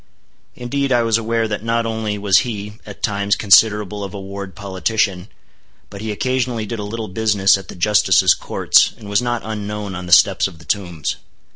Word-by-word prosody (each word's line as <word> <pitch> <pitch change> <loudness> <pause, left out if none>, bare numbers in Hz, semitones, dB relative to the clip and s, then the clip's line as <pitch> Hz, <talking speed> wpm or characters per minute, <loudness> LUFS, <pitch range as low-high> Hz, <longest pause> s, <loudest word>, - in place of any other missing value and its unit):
Indeed 135 +3 -2
I 120 -2 +3
was 115 -1 +2
aware 115 0 -1
that 105 -1 -4
not 115 0 0
only 110 -2 -3
was 100 -2 +4
he, 105 -2 -5
at - - -11
times, 100 -1 0
considerable 105 0 +3
of 100 +1 -7
a - - -5
ward 100 -1 -8
politician, 95 0 -2 0.6
but 100 - -9
he 110 0 -3
occasionally 125 0 -1
did 115 +1 -5
a - - -4
little 110 +2 -5
business 100 0 +2
at 95 -2 -7
the - - -10
Justices' 95 +1 +4
courts, - - +2
and 105 - -11
was 100 +2 +2
not 120 -1 -2
unknown 105 -2 -5
on 90 0 -7
the - - -7
steps 95 +2 +5
of 90 -4 -13
the - - -16
Tombs. 85 -7 -3
105 Hz, 190 wpm, -19 LUFS, 100-115 Hz, 0.6 s, steps